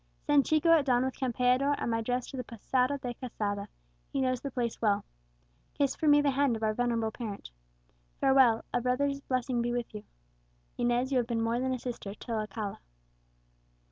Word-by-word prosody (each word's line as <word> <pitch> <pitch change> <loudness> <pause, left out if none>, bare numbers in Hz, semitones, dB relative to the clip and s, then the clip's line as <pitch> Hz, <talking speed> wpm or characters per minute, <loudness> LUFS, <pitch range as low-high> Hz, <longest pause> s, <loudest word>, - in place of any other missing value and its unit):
Send 290 -2 +4
Chico 310 +2 +3
at 320 -4 +5
dawn 250 -1 +3
with 260 - -2
Campeador 255 +2 +2
and - - -2
my 225 0 0
dress 245 +2 -1
to 270 - -7
the 250 - -3
Posada 250 +4 0
de 250 -3 -5
Quesada; 205 -5 -4 0.4
he - - -1
knows 255 -2 0
the 280 - -4
place 245 -3 -3
well. 205 -3 +2 0.7
Kiss 280 -2 +1
for 315 - -1
me 290 0 +7
the 285 -1 +2
hand 275 -2 +2
of 220 - -6
our 215 0 +2
venerable 230 -1 0
parent. 210 - -7 0.7
Farewell! 265 -4 +4
a 245 - +1
brother's 275 +3 0
blessing 255 -2 -1
be 240 0 -1
with 240 -1 -3
you! 210 -1 -7 0.7
Inez, 245 +2 +1
you 260 - +3
have 240 - -1
been 235 -2 -1
more 230 +1 0
than 260 +1 -1
a 255 - 0
sister 230 -5 -6
to 235 - -9
Alcala." 215 -2 -3
245 Hz, 195 wpm, -30 LUFS, 230-265 Hz, 0.7 s, me